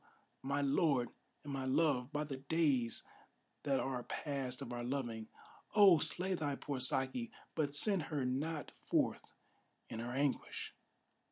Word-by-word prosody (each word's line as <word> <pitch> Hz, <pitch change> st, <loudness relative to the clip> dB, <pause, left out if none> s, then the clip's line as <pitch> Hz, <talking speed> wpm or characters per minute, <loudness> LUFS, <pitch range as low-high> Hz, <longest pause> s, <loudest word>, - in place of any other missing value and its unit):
my 140 Hz, +2 st, 0 dB
lord 140 Hz, -3 st, +2 dB, 0.3 s
and 145 Hz, -1 st, -5 dB
my 135 Hz, -1 st, -2 dB
love, 130 Hz, -1 st, +2 dB
by 150 Hz, +1 st, -1 dB
the 140 Hz, -3 st, -5 dB
days 140 Hz, -4 st, +1 dB, 0.6 s
that 135 Hz, -2 st, +1 dB
are 130 Hz, -2 st, -1 dB
past 135 Hz, -1 st, -3 dB
of 120 Hz, -, -6 dB
our 120 Hz, 0 st, -3 dB
loving, 120 Hz, -4 st, -3 dB, 0.5 s
Oh! 195 Hz, -6 st, +8 dB
slay 180 Hz, +5 st, +1 dB
thy 145 Hz, -5 st, -1 dB
poor 140 Hz, -1 st, -4 dB
Saki, 135 Hz, -, 0 dB, 0.2 s
but 145 Hz, -3 st, 0 dB
send 195 Hz, +3 st, +4 dB
her 145 Hz, -4 st, -1 dB
not 150 Hz, +5 st, -2 dB
forth -, -, 0 dB, 0.5 s
in 115 Hz, -, -5 dB
her 120 Hz, +1 st, -3 dB
anguish! 140 Hz, +2 st, -1 dB
140 Hz, 145 wpm, -36 LUFS, 130-155 Hz, 0.6 s, Oh